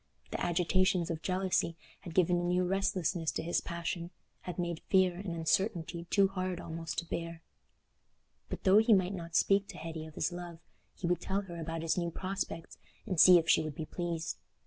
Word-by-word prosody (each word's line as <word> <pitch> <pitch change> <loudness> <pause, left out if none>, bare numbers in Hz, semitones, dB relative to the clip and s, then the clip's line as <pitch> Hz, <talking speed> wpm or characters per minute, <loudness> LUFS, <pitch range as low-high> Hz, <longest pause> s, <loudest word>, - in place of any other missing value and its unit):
The - - -3
agitations 180 0 +2
of 160 -1 -4
jealousy 185 -2 0 0.2
had 170 - -10
given 180 -1 +4
a - - -2
new 180 +1 +2
restlessness 180 -3 0
to - - -3
his 170 +1 0
passion—had 170 0 -6
made 170 -2 -2
fear 185 -2 +4
and 180 -2 -5
uncertainty 170 +1 0
too 195 +2 +4
hard 185 -2 -3
almost 165 -1 -5
to 170 - -1
bear. 165 0 -5 1.1
But - - -5
though 195 +2 +7
he 225 0 +5
might 190 -1 +3
not 170 -3 -6
speak 200 +3 +3
to - - -9
Hetty 160 -1 -6
of 155 - -13
his - - 0
love, 175 -1 -7 0.4
he - - -5
would 175 0 +1
tell 195 +1 -1
her 175 -4 -8
about 165 0 -4
his 165 +2 +1
new 170 -1 -1
prospects 185 -2 -5 0.3
and 185 -7 -2
see 180 +1 +10
if 165 -1 0
she - - +5
would 155 -2 -5
be 160 - -4
pleased. 170 -1 -3
175 Hz, 190 wpm, -32 LUFS, 165-185 Hz, 1.1 s, see